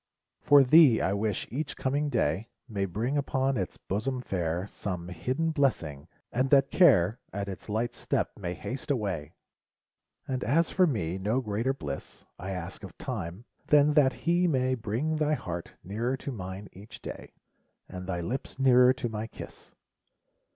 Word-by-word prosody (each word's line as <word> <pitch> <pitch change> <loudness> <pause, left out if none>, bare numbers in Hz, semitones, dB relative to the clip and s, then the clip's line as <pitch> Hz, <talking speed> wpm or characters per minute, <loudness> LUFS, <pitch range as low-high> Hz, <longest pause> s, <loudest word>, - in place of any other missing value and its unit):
For 145 -1 +7
thee 135 -3 +7
I 95 - +1
wish 105 0 -1
each 145 +3 -3
coming 145 +3 0
day 95 - 0 0.2
May 100 -3 -1
bring 115 +10 -1
upon 135 -1 0
its 95 -6 -3
bosom 125 +7 -2
fair 85 -2 -1
Some 90 -4 -5
hidden 130 - -1
blessing, 95 - 0 0.2
and 130 +2 +1
that 135 -1 +5
Care 115 - +5
At 100 0 -3
its 95 +2 -8
light 115 +3 -1
step - - -1
may 90 0 -4
haste 130 - -6
away! 95 - -2 0.9
And 130 -1 -2
as 160 +6 +2
for 185 -1 +4
me^ 95 - -1
no 110 +6 +1
greater 115 +2 -1
bliss 70 - -7
I 95 - -5
ask 90 +2 -5
of 100 - -10
Time, 105 -4 -5 0.2
than 150 0 +5
that 145 -3 +5
he 175 +1 +3
may 130 -4 +2
Bring 125 +7 -1
thy 155 0 +2
heart 85 - -6
nearer 115 +7 -2
mine 95 -2 -6
each 105 +4 -12
day, - - -8 0.5
And 90 0 -7
thy 90 -2 -2
lips 125 +11 -4
nearer 125 -1 +6
to 130 -1 -3
my 110 0 -4
kiss - - -11
115 Hz, 160 wpm, -29 LUFS, 95-135 Hz, 0.9 s, For